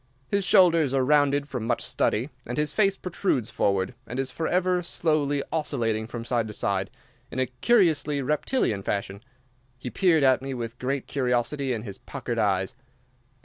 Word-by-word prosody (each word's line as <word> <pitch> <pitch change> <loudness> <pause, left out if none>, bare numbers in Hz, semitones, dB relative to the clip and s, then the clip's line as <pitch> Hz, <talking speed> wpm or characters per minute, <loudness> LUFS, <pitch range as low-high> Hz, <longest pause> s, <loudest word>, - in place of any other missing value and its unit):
His 200 0 +1
shoulders 170 -8 +5
are 130 -1 +2
rounded 145 0 +3
from 125 -5 -4
much 120 - 0
study, 120 +8 0 0.2
and 120 - -4
his 150 0 0
face 195 -2 +2
protrudes 175 - -1
forward, 100 +1 0
and 125 - -5
is 135 0 -2
forever 180 +3 +1
slowly 150 -4 0
oscillating 115 -8 -1
from 115 0 -6
side 120 -2 0
to 105 - -7
side 95 -2 -1 0.4
in - - -8
a 130 - +2
curiously 150 - +2
reptilian 145 - 0
fashion. 100 0 -3 0.6
He 125 -1 -6
peered 170 -6 +3
at 130 -1 +4
me 135 0 -4
with 120 0 -6
great 135 +1 -2
curiosity 130 +1 0
in 115 -3 -2
his 100 -4 -8
puckered 125 -4 -5
eyes. 95 0 +1
135 Hz, 165 wpm, -26 LUFS, 115-155 Hz, 0.6 s, shoulders